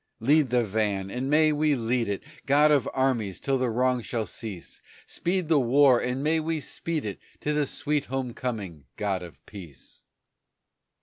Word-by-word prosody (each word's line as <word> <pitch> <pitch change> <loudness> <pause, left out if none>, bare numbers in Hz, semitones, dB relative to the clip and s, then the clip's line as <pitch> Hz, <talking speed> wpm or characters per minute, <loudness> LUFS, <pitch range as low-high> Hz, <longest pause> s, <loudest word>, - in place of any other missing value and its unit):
Lead 145 +3 +3
the 120 0 +2
van, 100 -2 -1
and 130 +4 -3
may 155 +1 +4
we 150 0 +2
lead 120 -2 0
it, 100 - -3 0.2
God 145 +2 +5
of 140 -5 +3
armies, 120 -8 0
till 135 -1 0
the 125 -1 +1
wrong 125 +2 +1
shall 115 -1 -2
cease; 100 -1 -7 0.2
Speed 180 -1 -2
the 155 -2 +4
war, 130 0 +5
and 125 +2 -2
may 160 +2 +2
we 160 0 -1
speed 155 0 -3
it 100 -2 -5 0.2
To 150 - 0
the 150 -1 +1
sweet 150 +1 -1
home 130 -2 -3
coming, 100 - -5
God 100 -3 -1
of 85 -6 -10
peace! 85 -10 -10
125 Hz, 175 wpm, -26 LUFS, 105-145 Hz, 0.2 s, God